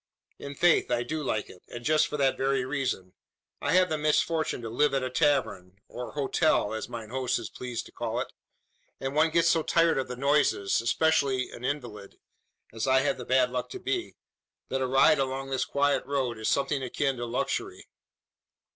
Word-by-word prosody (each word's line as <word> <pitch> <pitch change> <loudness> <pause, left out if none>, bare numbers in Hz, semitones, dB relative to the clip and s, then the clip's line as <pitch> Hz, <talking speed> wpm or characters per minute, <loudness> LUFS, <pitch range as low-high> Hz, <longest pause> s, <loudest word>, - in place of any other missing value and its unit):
"In 140 0 -7
faith 175 +3 +3
I 120 -1 +1
do 155 +5 -3
like 110 -7 -2
it; 90 - -14
and 120 0 -9
just 155 0 +3
for 150 - -4
that 135 -2 +2
very 135 -1 0
reason. 130 -9 -3 0.5
I 145 - 0
have 185 0 +5
the 155 - -1
misfortune 155 +1 +1
to 115 - -4
live 145 +4 +2
at 135 - 0
a 130 - -3
tavern, 130 - 0
or 125 +3 -8
`hotel,' 140 -5 +1
as 110 - -5
mine 115 -3 -7
host 130 -1 0
is - - -7
pleased 125 -2 -5
to - - -14
call - - -3
it; - - -5 0.7
and 135 0 -3
one 155 +2 +3
gets 170 +1 +3
so 165 -1 +3
tired 165 -2 +2
of 130 - -2
the 125 - -5
noises 140 -7 +2
especially 135 0 +1
an 120 - -10
invalid, 120 -8 -5 0.6
as 115 +3 -3
I 130 0 +4
have 135 -1 0
the 125 - -6
bad 130 -1 +3
luck 125 -1 -3
to 380 - -7
be 365 -1 -3 0.5
that 135 - -1
a 130 - +1
ride 135 +3 +5
along 135 0 -2
this 135 - 0
quiet 145 0 +1
road 130 -5 -1
is 110 - -1
something 140 0 0
akin 135 +1 -1
to 120 0 -4
luxury. 120 - -3
135 Hz, 200 wpm, -28 LUFS, 125-150 Hz, 0.7 s, have